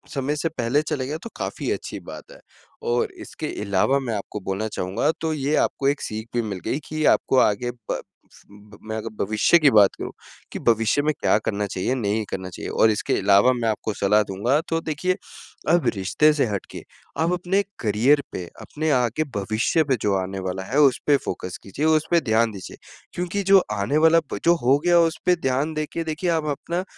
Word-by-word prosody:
समय 140 +2 -1
से 165 +2 -1
पहले 135 -1 0
चले 150 -4 -3
गया 150 +3 -3
तो 230 - -7
काफ़ी - - -3
अच्छी - - -4
बात - - -10
है। - - -14 0.5
और 450 -3 0
इसके 155 - -6
इलावा 105 +7 +2
मैं 125 -4 -3
आपको 105 +1 -5
बोलना 95 +3 -3
चाहूँगा, 100 - -1
तो 160 -1 -1
ये 145 0 0
आपको 135 - +1
एक 145 +1 +1
सीख 110 +1 -5
भी 120 - +2
मिल 100 -5 -5
गई 130 +6 -1
कि 155 0 -2
आपको 130 - +3
आगे 120 +3 +2 0.2
ब - - -1 0.3
स - - -18 0.5
मैं 110 0 -3
अगर 115 +1 -5 0.2
भविष्य 110 - +4
की 150 - +6
बात 105 -4 +5
करूँ, - - -5 0.4
कि - - -5
भविष्य 115 +3 +2
में 155 +1 +1
क्या - - +3
करना 105 -1 -1
चाहिए, 95 +6 -2
नहीं 110 -2 -1
करना 95 -1 -5
चाहिए। 85 - -7
और 110 - +4
इसके 105 - -1
इलावा 100 +5 +4
मैं 115 - +1
आपको 110 0 -2
सलाह 105 +2 +3
दूँगा 110 +10 0
तो 165 - +1
देखिए, 165 +4 -1 0.5
अब 170 -5 +3
रिश्ते 100 +11 +3
से 145 -3 +1
हट 100 -3 -3
के - - -7 0.4
आप 165 +2 +2
अपने 180 +3 +1 0.2
करियर 120 +7 +3
पे, 90 - -4 0.2
अपने 155 +1 -3
आगे 125 +3 +1
भविष्य 110 +10 +1
पे 140 -3 +1
जो 105 - +1
आने 95 +1 -4
वाला 95 0 -4
है 125 +9 -3
उसपे 145 0 +4
फोकस 90 0 -5
कीजिये। 140 +11 -2
उसपे 160 +2 +3
ध्यान 115 -2 +2
दीजिये। 95 -3 -9 0.4
क्योंकि 180 +3 -2
जो 195 0 +6 0.2
आने 100 +10 0
वाला 160 +1 +5
प - - -3
जो 170 - +6
हो 130 +3 +4
गया 175 -1 +5
उसपे 170 +2 +2
ध्यान 140 +1 -1
देके 155 +2 -3
देखिए, 160 +3 -2
आप 160 -2 +1
अपना 170 +5 -2
130 Hz, 200 wpm, -23 LUFS, 105-155 Hz, 0.5 s, की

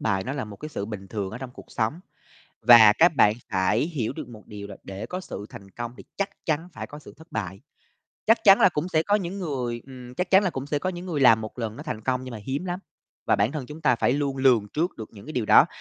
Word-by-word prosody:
bại 95 -3 0
nó 130 - -3
là 140 -4 -3
một 105 -2 -10
cái 155 - -7
sự 100 -9 -4
bình 100 -3 -7
thường 100 -3 -3
ở 125 - -7
trong 130 -1 -7
cuộc - - -13
sống. 120 +9 -1 0.6
Và 110 -2 +9
các 165 -1 +6
bạn 105 -4 +5 0.2
phải 95 +2 +2
hiểu 140 -10 -2
được 145 -3 -7
một 110 -3 -13
điều 105 -2 -8
là 100 -1 -9
để 100 +3 -6
có 185 +6 -4
sự 105 - -7
thành 100 0 -12
công 120 +3 -6
thì - - -12
chắc 200 0 0 0.2
chắn 160 +2 -1
phải - - -6
có 145 - -10
sự 150 - -14
thất 160 +1 -17
bại. 100 -3 -4 0.7
Chắc 225 +1 +4
chắn 195 -2 +8
là - - +7
cũng 170 0 -3
sẽ 160 -2 +2
có 205 - +1
những 195 -1 -1
người 125 -9 -3
ừm, 125 -2 -11
chắc 180 +6 -2
chắn 190 +1 +6
là 185 - +1
cũng 135 -3 -5
sẽ 145 0 0
có 185 - -2
những 175 0 -7
người 155 -5 -2
làm 115 -4 +6
một 110 +2 -8
lần 110 -2 -3
nó 150 - -7
thành 150 -8 -5
công 130 +1 -1
nhưng 130 - -7
mà 115 - -6
hiếm 140 +6 -2
lắm. 180 -1 -3 0.5
Và - - +4
bản 105 +6 +1
thân 150 -5 -4
chúng 150 +3 -9
ta 130 -6 +3
phải 125 - +2
luôn 140 -1 -1
lường 125 -6 +3
trước 170 +4 -1
được 110 - -8
những 100 -2 -13
cái 155 - -7
điều 125 -7 -1
đó. - - +7
130 Hz, 285 wpm, -25 LUFS, 110-160 Hz, 0.7 s, Và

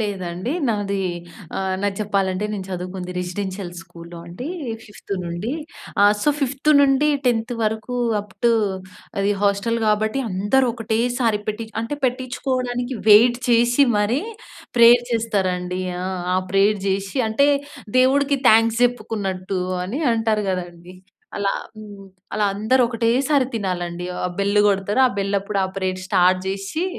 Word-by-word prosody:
లేదండి. 190 - -3 0.2
నాది 200 -2 -1 0.6
ఆహ్, 190 -1 -1
నాది 200 -1 -1
చెప్పాలంటే 195 -1 0
నేను 195 -2 -4
చదువుకుంది 180 0 -5
రెసిడెన్షియల్ 185 +1 -4
స్కూల్‌లో 170 0 -12
అండి 215 - -7 0.4
5త్ 205 -1 -10
నుండి. 175 +9 -4 0.5
ఆహ్, 205 0 +7
సో 295 - +4
5త్-10త్ 275 -3 +2
వరకు 220 +3 -2 0.3
అప్ 205 0 -15
టూ 235 - +5 0.7
అది 200 +1 +1
హాస్టల్ 205 +3 +1
గాబట్టి 215 +4 +1
అందరూ 205 +8 +2
ఒకటేసారి 230 0 0
పెట్టిచ్ 220 +1 -4
అంటే 235 +6 -4
పెట్టిచ్చుకోవడానికి 255 0 -2
వెయిట్ 240 +4 +7
చేసి 240 +3 +4
మరీ 225 +7 +1 0.6
ప్రేయర్ 240 +1 +7
చేస్తరండి. 185 -5 -1 0.2
ఆ! - - -3 0.3
ఆ - - +3
ప్రేయర్ 200 +1 +3
చేషి 195 +6 -2
అంటే 255 +6 +3 0.5
దేవుడికి 280 +2 +3
థాంక్స్ 225 +1 +4
చెప్పుకున్నట్టు 195 -6 -2 0.2
అని 235 - -4
అంటారు 220 -2 0
గదండీ. 175 -1 -6 0.4
అలా 200 -1 0 0.3
హ్మ్, 205 -2 -11 0.3
అలా 210 -1 +1
అందరూ 220 +6 +2
ఒకటేసారి 255 +5 +2
తినాలండి. 180 -4 -3
ఆహ్, 180 - -1
బెల్ 200 +1 +2
గొడతరు 200 +4 +1
ఆ - - +2
బెల్ 200 0 0
అప్పుడు 200 0 -3
ఆ - - 0
ప్రేయర్ 185 -1 -2
స్టార్ట్ 185 -1 +3
చేషి 195 - -3
210 Hz, 130 wpm, -21 LUFS, 190-240 Hz, 0.7 s, ఆహ్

